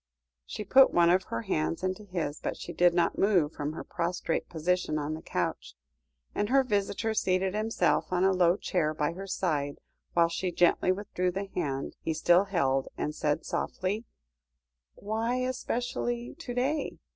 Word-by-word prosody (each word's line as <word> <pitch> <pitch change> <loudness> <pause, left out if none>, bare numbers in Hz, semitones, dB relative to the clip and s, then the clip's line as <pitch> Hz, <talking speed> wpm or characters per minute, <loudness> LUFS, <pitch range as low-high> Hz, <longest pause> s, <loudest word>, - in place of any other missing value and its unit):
She - - -5
put 265 +6 +6
one 170 0 +5
of 185 +1 +2
her 115 0 -4
hands 80 - -1
into 185 +3 -2
his, 165 -6 -3
but - - -3
she - - -7
did 175 0 +5
not 175 - +1
move 180 -7 +3
from 145 +1 -3
her - - -6
prostrate 170 -1 -2
position 175 -1 0
on 150 +1 -2
the 160 - -6
couch, - - -3 0.6
and 205 - -1
her 270 +1 +5
visitor 210 -1 -1
seated 185 -2 +1
himself 215 -2 +1
on 180 0 +2
a 195 - +5
low 180 0 +3
chair 155 -7 0
by 150 +1 0
her 195 +3 -7
side, 150 -7 -1 0.4
whilst 170 0 +3
she 185 -1 -1
gently 175 +1 +3
withdrew 185 -2 -1
the 195 +3 -3
hand 140 -6 -3
he 160 - -2
still 175 +4 +4
held, 135 -9 +1
and 150 - -2
said 150 +1 -1
softly 200 +5 -2 0.9
"Why 225 +4 -2
especially 245 -1 -2
to 325 -7 -7
day? 275 +5 -1
180 Hz, 170 wpm, -29 LUFS, 160-210 Hz, 0.9 s, put